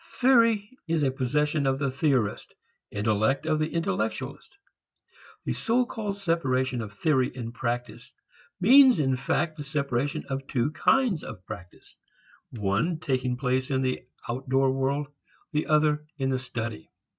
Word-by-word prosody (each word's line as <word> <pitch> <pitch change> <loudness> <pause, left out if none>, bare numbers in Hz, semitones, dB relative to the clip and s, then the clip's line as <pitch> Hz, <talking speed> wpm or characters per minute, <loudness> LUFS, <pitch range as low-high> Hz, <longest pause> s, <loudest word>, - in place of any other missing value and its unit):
Theory 230 -5 +4 0.2
is 165 -2 +1
a 135 - +2
possession 145 +3 0
of 135 0 +2
the 140 -1 -1
theorist, 130 -6 0 0.3
intellect 110 +7 +1
of 155 -1 +1
the 155 +1 -1
intellectualist. 185 - -3 0.9
The - - 0
so 245 +2 +1
called 210 -4 -4
separation 130 -9 0
of 110 -2 -6
theory 130 +2 +1
and 120 -2 -6
practice 120 -1 -4 0.5
means 255 - +7
in 135 -3 +2
fact 155 +5 -1
the 145 - -5
separation 140 -2 -2
of 135 0 -4
two 130 +2 0
kinds 225 - +2
of 90 - -9
practice, 90 0 -11 0.5
one 110 - 0
taking 130 -4 -1
place 130 0 0
in 130 -1 +1
the 130 0 -1 0.3
outdoor 135 +2 +1
world, 135 +2 0 0.5
the 150 0 -1
other 150 -1 +2
in 135 -2 0
the 130 - 0
study. 115 -7 -5
135 Hz, 145 wpm, -27 LUFS, 125-160 Hz, 0.9 s, means